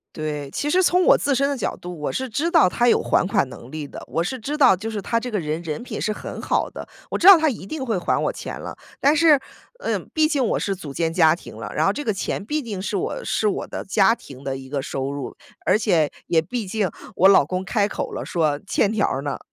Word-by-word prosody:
对， 150 -2 -4
其 290 - -2
实 370 +4 +4
从 360 0 +3
我 - - +6
自 280 - +1
身 275 +2 +2
的 285 - -1
角 240 - -2
度， 175 -1 -8
我 150 - -2
是 260 0 -3
知 285 +9 -1
道 330 - +5
他 240 +5 +1
有 - - +4
还 - - +2
款 190 - +1
能 120 - -11
力 155 -1 -5
的， - - -10
我 165 - -1
是 260 +7 -3
知 285 +6 -4
道 280 -9 +6
就 215 +5 -5
是 210 -2 -4
他 230 +4 0
这 250 - -5
个 215 - -1
人 155 -1 -3
人 155 +4 -4
品 250 - -6
是 215 - 0
很 - - -7
好 - - 0
的， - - -9 0.2
我 - - -1
知 345 - +2
道 395 -1 +12
他 315 0 +2
一 215 -6 -7
定 300 +3 -4
会 225 -5 -1
还 175 - 0
我 - - 0
钱 - - -7
了。 - - -7 0.2
但 285 +2 +4
是， 315 -2 +6 0.4
呃， - - -1 0.2
毕 315 -1 +4
竟 290 -4 +1
我 - - +1
是 195 - -1
组 150 -7 -9
建 165 +1 0
家 160 -2 +5
庭 - - -12
了， - - -6
然 - - +2
后 - - +3
这 295 - -4
个 220 -7 0
钱 195 +1 -3
毕 300 +6 -2
竟 210 -5 -5
是 200 +2 -2
我 185 - -3
是 215 - 0
我 200 - -2
的 - - -6
家 195 +2 +3
庭 135 - -13
的 135 -1 -3
一 130 0 -10
个 140 -1 -1
收 135 0 -3
入， 140 -3 -6 0.3
而 - - +4
且 175 -9 +2 0.2
也 165 - +3
毕 220 +7 -4
竟 205 0 0 0.3
我 190 - +5
老 195 -7 +6
公 185 +5 -3
开 205 0 +1
口 210 - -4
了， - - -4
说： 155 -4 0
“欠 200 0 +2
条 220 -2 +1
儿 135 - -2
呢？” 145 -1 -3
200 Hz, 290 characters per minute, -22 LUFS, 160-260 Hz, 0.4 s, 道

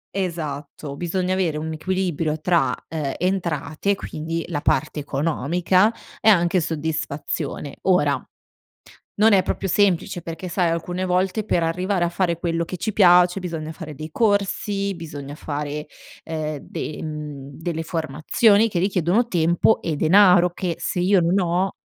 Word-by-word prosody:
Esatto. 150 -5 -4
Bisogna 180 +3 -1
avere 175 -5 0
un 160 +1 -4
equilibrio 165 -3 -1
tra, 170 +1 +2 0.2
ehm, 150 -4 -3
entrate, 180 0 -1
quindi 165 -2 -4
la 150 -4 -3
parte 155 0 0
economica 165 - +1 0.3
e 220 - +5
anche 175 -2 +4
soddisfazione. 155 -2 -3
Ora 150 -7 +2 1.0
non 220 0 +5
è 190 -2 +5
proprio 195 - -2
semplice 180 -2 +1
perché 170 +2 -6
sai 175 -1 +1
alcune 175 +2 -2
volte 185 +4 0
per 175 -5 +1
arrivare 180 +2 0
a - - +1
fare 170 -1 0
quello 170 -1 -1
che 185 - -5
ci 215 +5 -3
piace 180 -1 +5
bisogna 160 -3 -5
fare 155 -2 -8
dei 155 +3 -8
corsi, 200 -1 0
bisogna 145 -3 -8
fare, 150 0 -4 0.4
ehm, 155 -2 -3
de 150 - -6
mhmm, 150 -3 -6
delle 165 -1 -3
formazioni 165 - +2
che 175 -4 -1
richiedono 190 +4 +2
tempo 175 +2 +2
e 165 - -2
denaro, 180 +3 +5
che 175 -1 -3
se - - -3
io 185 +1 +4
non 175 +4 +2
ho 180 +1 +1
170 Hz, 145 wpm, -22 LUFS, 155-185 Hz, 1.0 s, e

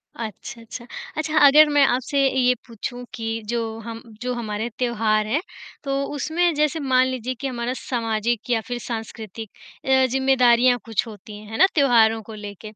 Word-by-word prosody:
अच्छा, 230 +1 -7
अच्छा। 235 +1 -9 0.3
अच्छा, 310 0 -1
अगर 300 +2 +7
मैं 290 -1 +4
आपसे 260 +3 0
ये 250 -1 +3
पूछूँ 245 +2 -6
कि 225 -2 -6 0.2
जो 235 0 0 0.2
हम 225 0 -8 0.2
जो 250 0 -2
हमारे 220 -1 -3
त्योहार 215 -3 +1
हैं, 290 +9 0 0.4
तो 275 0 -1
उसमें 335 +4 +1
जैसे 305 +1 +1
मान 260 -2 +3
लीजिए 255 -1 -3
कि 275 - -1
हमारा 245 0 -3
सामाजिक 230 -1 -2
या 225 -2 +2
फिर 245 -1 -3
सांस्कृतिक 225 -2 -6 0.4
अ, 265 0 +4
ज़िम्मेदारियाँ 255 -2 +4
कुछ 225 0 -1
होती 210 0 -10
हैं, 210 - -13
है 225 - -4
ना? 380 - +7
त्योहारों 225 -6 +4
को 220 - -10
लेके, 210 0 -9
240 Hz, 170 wpm, -23 LUFS, 225-265 Hz, 0.4 s, अगर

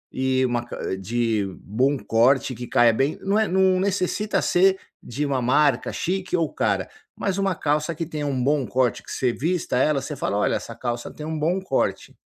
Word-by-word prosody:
e 130 0 +1
uma 120 -1 -1
ca 120 -5 -4
de 110 +2 -1 0.2
bom 130 +8 +1
corte, 130 +3 +2
que 120 0 -7
caia 115 -1 +4
bem. 135 +6 0
Não 200 +2 +2
é 220 - +2
não 190 0 +3
necessita 200 +1 0
ser 190 +2 +4 0.2
de 140 +5 -3
uma 135 -2 0
marca 130 +1 +2
chique 185 0 -2
ou 165 -2 +1
cara, 100 -3 0 0.3
mas 195 -1 -1
uma 195 -2 +1
calça 150 +1 -1
que 165 - -3
tenha 150 -2 -4
um 135 -3 -1
bom 145 +1 +2
corte, 130 -1 +1
que - - -11
você 125 -2 0
vista 165 0 -1
ela, 140 +2 +2
você 150 - -5
fala: 100 -6 -2
“Olha, 105 - +1
essa 115 - -8
calça 120 0 -4
tem 150 - -8
bom 170 +5 +1
corte". 190 - -2
140 Hz, 195 wpm, -23 LUFS, 120-180 Hz, 0.3 s, caia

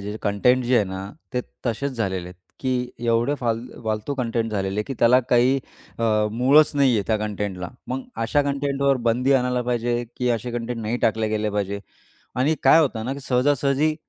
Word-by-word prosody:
जे 105 - -5
कंटेंट 125 +5 +2
जे 125 +1 +2
आहे 105 - +3
ना, 95 0 -5 0.3
ते 125 - +1 0.3
तसेच 135 +4 -1
झालेले 95 -7 -2
आहेत, 90 - -12 0.3
की 130 -1 0 0.3
एवढे 115 +4 +2
फाल 115 -2 0 0.2
फालतू 110 +5 -2
कंटेंट 115 -2 -1
झालेले 100 -1 -2
आहे, - - 0
की 135 - -5
त्याला 125 +2 +6
काही 125 +3 +4 0.4
अ, 115 - 0 0.3
मूळच 135 +6 +5
नाहीये 130 -7 +3
त्या 110 - +2
कंटेंटला. 100 -4 -3 0.2
मग 130 +1 -3 0.2
अशा 145 +6 +2
कंटेंटवर 140 -1 0
बंदी 125 +4 +2
आणायला 125 -2 +2
पाहिजे, 120 0 -1
की 125 - 0
असे 120 +1 -2
कंटेंट 120 0 -3
नाही 110 +2 -1
टाकले 110 -1 0
गेले 110 0 -1
पाहिजे. 100 -1 -2 0.6
आणि 135 +5 +2
काय 135 +5 +7
होतं 125 -8 0
ना 130 - -2
की 140 - -6
सहजासहजी 140 +3 +1
120 Hz, 185 wpm, -23 LUFS, 110-135 Hz, 0.6 s, काय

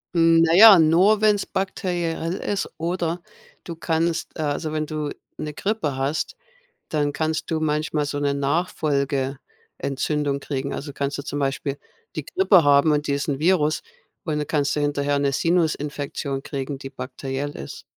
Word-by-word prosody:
Hm, 165 -1 +5
naja, 195 +5 +9
nur 175 +7 +4
wenn 210 -1 +5
es - - -4
bakteriell 175 -3 -2
ist, 200 0 -2
oder 170 +1 -2 0.4
du 170 - -7
kannst, 165 +1 -1
äh 155 - -2
also, 150 +2 -2
wenn 155 0 -1
du 150 -1 -3 0.3
'ne 150 0 -4
Grippe 195 -9 -1
hast, 140 - -1 0.5
dann 145 -2 0
kannst 155 +1 -2
du 160 -1 -1
manchmal 150 -1 0
so 145 0 -3
'ne 145 -1 0
Nachfolgeentzündung 140 -1 -2
kriegen. 140 0 -3
Also, 145 0 -6
kannst 140 0 -2
du - - -4
zum 145 0 -4
Beispiel 140 0 -2 0.4
die - - -3
Grippe 285 - +4
haben 145 +2 +5
und 150 0 +1
diesen 140 0 -1
Virus. 155 -2 +2 0.4
Und 155 -3 -1
dann 150 - -2
kannst 145 -2 +1
du 150 - -1
hinterher 145 0 0
'ne 140 -1 +2
Sinusinfektion 145 -3 -1
kriegen, 140 -1 -4
die 135 0 -8
bakteriell 135 +2 -5
ist. 70 - -8
150 Hz, 155 wpm, -23 LUFS, 140-165 Hz, 0.5 s, naja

